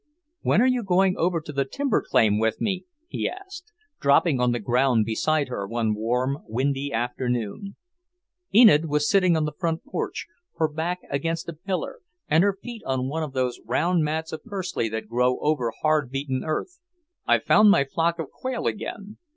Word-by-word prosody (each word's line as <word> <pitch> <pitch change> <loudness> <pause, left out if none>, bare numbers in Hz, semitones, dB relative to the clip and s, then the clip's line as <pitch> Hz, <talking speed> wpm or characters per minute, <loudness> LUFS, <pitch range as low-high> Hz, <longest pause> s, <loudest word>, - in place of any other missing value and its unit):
"When 225 - +3
are - - +4
you 255 -1 +2
going 190 -2 +2
over 170 0 +1
to 150 - -9
the 140 0 +1
timber 270 - -1
claim 105 -1 +2
with 110 0 0
me?" 195 -4 -2 0.2
he - - -2
asked, 375 -2 -10 0.3
dropping 140 0 +3
on 125 0 +3
the 120 - 0
ground 120 +1 +2
beside 145 +7 0
her 100 -5 -4
one 115 0 0
warm, 125 +6 -1
windy 135 +4 -1
afternoon. 125 - -3 0.8
Enid 210 -9 +7
was 150 0 +1
sitting 185 -4 +4
on 155 - +1
the 150 - -2
porch 165 +1 -2
floor, 280 - -3 0.5
her 160 - +2
back 165 +4 -3
against 165 +4 -2
a - - -5
pillar, 185 - -4 0.3
and 160 +3 +4
her 200 -1 +1
feet 240 -2 -7
on 130 -1 -1
one 160 +3 -2
of 150 -4 -4
those 130 -2 -1
round 170 +9 +1
mats 160 +1 -2
of 160 - -6
pursley 190 - -3
that 110 0 -5
grow 125 +2 +1
over 145 -6 0
hard 155 -4 +2
beaten 135 -1 -3
earth. 160 - -3 0.5
"I've - - +3
found 215 0 +6
my 200 -9 +5
flock 165 +4 0
of 165 -4 -6
quail 255 -2 -4
again. 205 0 -4
150 Hz, 185 wpm, -25 LUFS, 125-185 Hz, 0.8 s, Enid